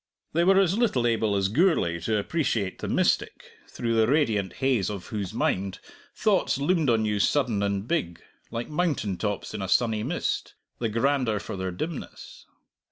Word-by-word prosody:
They 170 +2 +3
were 190 +2 +5
as 190 -1 +3
little 210 - +1
able 110 -3 +1
as 95 -1 +2
Gourlay 110 - +2
to 105 +6 0
appreciate 105 - -1
the - - -4
mystic, - - 0 0.2
through 115 -1 -2
the 110 -1 +3
radiant 110 - +1
haze 125 -8 +1
of 100 -3 -6
whose 100 -4 -3
mind 95 0 -1 0.4
thoughts 205 -10 +2
loomed 150 0 +1
on 110 -2 +2
you 105 -1 0
sudden 120 -3 +1
and 100 +1 -1
big, 85 - -1 0.3
like 120 0 -4
mountain 150 - -1
tops 105 +2 -3
in - - -4
a 95 - -4
sunny 110 -2 +2
mist, 140 +11 -2 0.2
the 115 - 0
grander 115 -1 +1
for 100 - -6
their 95 0 -3
dimness. 150 - -7
115 Hz, 170 wpm, -26 LUFS, 100-145 Hz, 0.4 s, were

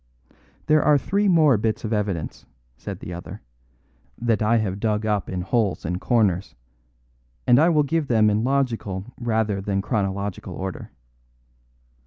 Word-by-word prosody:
"There 155 0 +4
are 150 -1 +4
three 200 +9 0
more 155 - +5
bits 110 0 -1
of 110 0 -2
evidence," 100 -7 -3 0.3
said - - -8
the 90 - -6
other, 85 - -9 0.8
"that 115 -3 +1
I 110 +2 +3
have 100 -3 -2
dug 105 0 0
up 105 -2 -1
in 90 -1 -3
holes 100 0 0
and 90 +3 -3
corners; 100 -6 +1 0.9
and 125 +1 +5
I 165 +3 +5
will 155 -3 +3
give 150 +1 -1
them 110 -4 +3
in 105 +1 +2
logical 125 -5 -1
rather 110 -4 0
than 100 0 -1
chronological 100 -4 -3
order. 95 +1 -6
110 Hz, 150 wpm, -23 LUFS, 100-125 Hz, 0.9 s, more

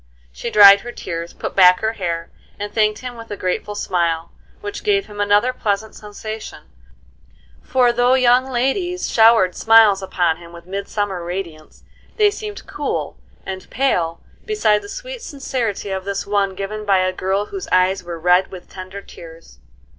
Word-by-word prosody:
She - - -5
dried 200 -1 +9
her 240 - -7
tears, 170 -5 -6
put - - -6
back 180 -1 +6
her 220 +1 0
hair, 170 -5 -4 0.3
and 205 0 -5
thanked 215 -1 +1
him 250 -1 -6
with 230 0 -10
a 205 - -5
grateful 185 +3 -3
smile, 170 -4 -1 0.3
which 410 -1 -7
gave 400 -2 +2
him 205 0 -6
another 205 +5 +3
pleasant 215 -2 -2
sensation; 215 +1 -8 1.0
for, 250 -2 +2
though 245 +2 +3
young 255 0 +3
ladies 350 +9 -1
showered 225 -5 +5
smiles 220 -2 +5
upon 175 -4 0
him 170 0 -14
with 170 0 -12
midsummer 195 -1 -3
radiance, 170 -3 -7 0.3
they 420 -2 +4
seemed 420 0 -7
cool - - -4 0.3
and 190 -1 -7
pale 175 -11 0 0.2
beside 215 - +1
the - - -11
sweet - - -7
sincerity 250 - -3
of 190 -1 -3
this 200 0 -3
one 200 -1 0
given 205 +2 -5
by 200 -2 +3
a 185 0 +1
girl 190 +2 -1
whose 385 - -7
eyes 185 +1 +2
were 175 -1 -6
red 180 +3 +3
with 185 -2 -11
tender 185 +1 -9
tears. 165 - -14
205 Hz, 165 wpm, -20 LUFS, 185-240 Hz, 1.0 s, dried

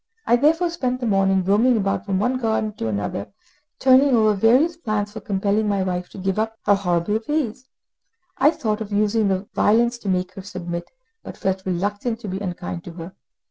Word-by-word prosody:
I 240 - +4
therefore 325 +7 +2
spent 255 -7 -2
the 250 - -3
morning 195 -3 +2
roaming 220 +6 +3
about 195 0 -1
from 195 -1 0
one 250 +6 0
garden 220 -2 -1
to 115 - -3
another, 100 -1 -3 0.5
turning 260 0 +5
over 215 -2 +4
various 250 - +3
plans 215 -9 -2
for 220 - -7
compelling 205 +2 0
my 200 -2 +1
wife 180 -1 -3
to - - -12
give 190 +1 -1
up 225 0 -2
her 205 - +5
horrible 195 +1 0
ways; 260 -5 -2 0.7
I 280 - +6
thought 220 -8 -2
of 215 -1 -6
using 205 -2 +1
violence 235 +3 +2
to 205 - -4
make 185 0 -1
her 195 - -8
submit, 175 -2 -6 0.3
but - - -10
felt 190 0 -2
reluctant 205 +6 -2
to 215 - -6
be 190 0 -3
unkind 175 -3 -5
to 175 - -8
her. 170 +2 -9
205 Hz, 190 wpm, -22 LUFS, 190-235 Hz, 0.7 s, I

